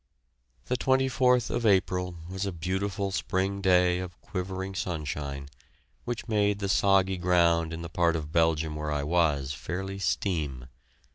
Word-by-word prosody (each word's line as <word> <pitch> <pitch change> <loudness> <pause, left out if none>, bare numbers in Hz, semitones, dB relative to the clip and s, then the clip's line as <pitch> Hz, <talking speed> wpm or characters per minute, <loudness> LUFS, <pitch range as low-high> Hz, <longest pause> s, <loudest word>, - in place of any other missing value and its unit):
The 125 - -1
24th 130 -2 +2
of 120 - -1
April 90 -3 +2
was 95 +2 -3
a - - -2
beautiful 95 +4 -2
spring 95 +1 -1
day 90 -2 +4
of 90 -1 -7
quivering 95 0 -4
sunshine, 75 -6 -4 0.6
which 120 -1 -4
made 105 -2 +2
the 100 -1 -3
soggy 95 -1 +3
ground 85 -2 +3
in 85 0 -5
the - - -5
part 85 0 +1
of 75 -2 -4
Belgium 80 -2 +2
where 75 0 -3
I 75 -1 -1
was 75 -4 +1
fairly 95 +7 -5
steam. 80 -9 -1
90 Hz, 145 wpm, -28 LUFS, 80-100 Hz, 0.6 s, day